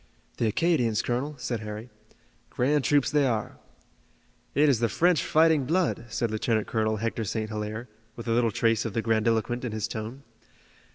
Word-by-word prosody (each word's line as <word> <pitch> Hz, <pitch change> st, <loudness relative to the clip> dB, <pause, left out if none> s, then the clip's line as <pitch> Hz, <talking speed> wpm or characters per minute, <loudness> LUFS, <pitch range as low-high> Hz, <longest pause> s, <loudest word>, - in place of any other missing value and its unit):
"The 115 Hz, -, +1 dB
Acadians, 120 Hz, -4 st, +1 dB
colonel," 130 Hz, +5 st, -2 dB
said 120 Hz, -3 st, -3 dB
Harry. 110 Hz, +2 st, -7 dB, 0.6 s
"Grand 140 Hz, +3 st, +1 dB
troops 145 Hz, 0 st, +2 dB
they 145 Hz, -2 st, +3 dB
are." 110 Hz, -4 st, -2 dB, 1.0 s
"It 150 Hz, +2 st, +5 dB
is 135 Hz, -6 st, +3 dB
the 115 Hz, -1 st, +1 dB
French 175 Hz, -1 st, +3 dB
fighting 160 Hz, -3 st, +3 dB
blood," 165 Hz, -4 st, 0 dB
said 115 Hz, 0 st, -1 dB
Lieutenant 110 Hz, 0 st, 0 dB
Colonel 110 Hz, -1 st, 0 dB
Hector 115 Hz, +1 st, -2 dB
St. 110 Hz, 0 st, -3 dB
Hilaire, 110 Hz, +2 st, -4 dB, 0.3 s
with 115 Hz, -, -8 dB
a -, -, 0 dB
little 115 Hz, 0 st, +3 dB
trace 115 Hz, +1 st, +1 dB
of 115 Hz, -, -4 dB
the 115 Hz, -, -1 dB
grandiloquent 115 Hz, +2 st, +1 dB
in 120 Hz, -4 st, -3 dB
his 110 Hz, +1 st, -2 dB
tone. 115 Hz, +4 st, -6 dB
115 Hz, 170 wpm, -27 LUFS, 110-135 Hz, 1.0 s, It